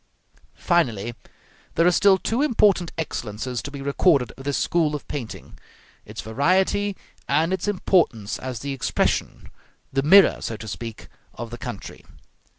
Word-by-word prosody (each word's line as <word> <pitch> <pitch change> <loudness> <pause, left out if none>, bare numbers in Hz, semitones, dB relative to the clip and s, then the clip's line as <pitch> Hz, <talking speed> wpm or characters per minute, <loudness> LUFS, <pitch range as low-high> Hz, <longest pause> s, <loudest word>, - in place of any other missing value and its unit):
Finally, 120 - 0 0.6
there 165 - +3
are 180 - +6
still 195 +1 +5
two 225 +7 -1
important 205 - +3
excellences 120 -5 -4
to - - -6
be 140 -1 -8
recorded 140 -3 +2
of 135 - -12
this 140 -1 0
school 160 -3 +1
of 145 - -7
painting: 125 -7 -7 0.5
its - - -7
variety, 190 - +1 0.3
and 160 +5 +2
its 190 - -2
importance 165 - +1
as 125 -3 -5
the 140 0 -3
expression 135 - -1 0.4
the 135 - +2
mirror, 190 +7 +6
so 115 - -4
to 110 - -9
speak 115 +1 -7 0.3
of 120 0 -7
the - - -5
country. - - -8
145 Hz, 150 wpm, -23 LUFS, 120-185 Hz, 0.6 s, are